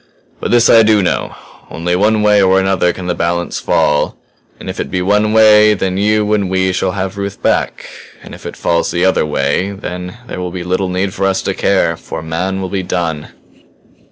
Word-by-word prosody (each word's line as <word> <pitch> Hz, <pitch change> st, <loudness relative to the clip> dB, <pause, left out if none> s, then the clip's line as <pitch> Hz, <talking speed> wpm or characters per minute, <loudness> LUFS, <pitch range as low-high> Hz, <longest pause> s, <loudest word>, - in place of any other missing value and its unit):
"But -, -, -3 dB
this 120 Hz, 0 st, +4 dB
I 115 Hz, -, +7 dB
do 110 Hz, -2 st, +3 dB
know -, -, -2 dB, 0.3 s
only 90 Hz, +2 st, -2 dB
one 105 Hz, +3 st, +2 dB
way 105 Hz, -1 st, +4 dB
or 95 Hz, 0 st, +4 dB
another 95 Hz, -2 st, +1 dB
can 95 Hz, -, -8 dB
the 90 Hz, -, -1 dB
balance 85 Hz, 0 st, -2 dB
fall; 75 Hz, 0 st, +1 dB, 0.4 s
and -, -, -10 dB
if -, -, -5 dB
it -, -, -3 dB
be 95 Hz, -, -2 dB
one 105 Hz, +3 st, +2 dB
way, 105 Hz, -1 st, +6 dB
then 95 Hz, -1 st, -2 dB
you 105 Hz, +1 st, +1 dB
and 100 Hz, -3 st, 0 dB
we 95 Hz, 0 st, +1 dB
shall 90 Hz, 0 st, -1 dB
have 95 Hz, +1 st, -4 dB
Ruth 100 Hz, 0 st, -5 dB
back. -, -, -1 dB, 0.4 s
And -, -, -11 dB
if -, -, -12 dB
it -, -, -8 dB
falls 85 Hz, 0 st, 0 dB
the 85 Hz, +1 st, 0 dB
other 95 Hz, -4 st, +2 dB
way 75 Hz, +6 st, 0 dB
then 90 Hz, -1 st, -7 dB
there 90 Hz, -, -7 dB
will 90 Hz, 0 st, -3 dB
be 90 Hz, 0 st, -6 dB
little 90 Hz, +1 st, -1 dB
need 95 Hz, +1 st, -2 dB
for 95 Hz, -, 0 dB
us 95 Hz, -1 st, -1 dB
to 100 Hz, -, -1 dB
care. 95 Hz, -4 st, +1 dB
For 80 Hz, -, -7 dB
man 90 Hz, +4 st, -3 dB
will 95 Hz, -, -4 dB
be 95 Hz, +1 st, -2 dB
done!" 85 Hz, -4 st, -3 dB
95 Hz, 215 wpm, -15 LUFS, 90-100 Hz, 0.4 s, I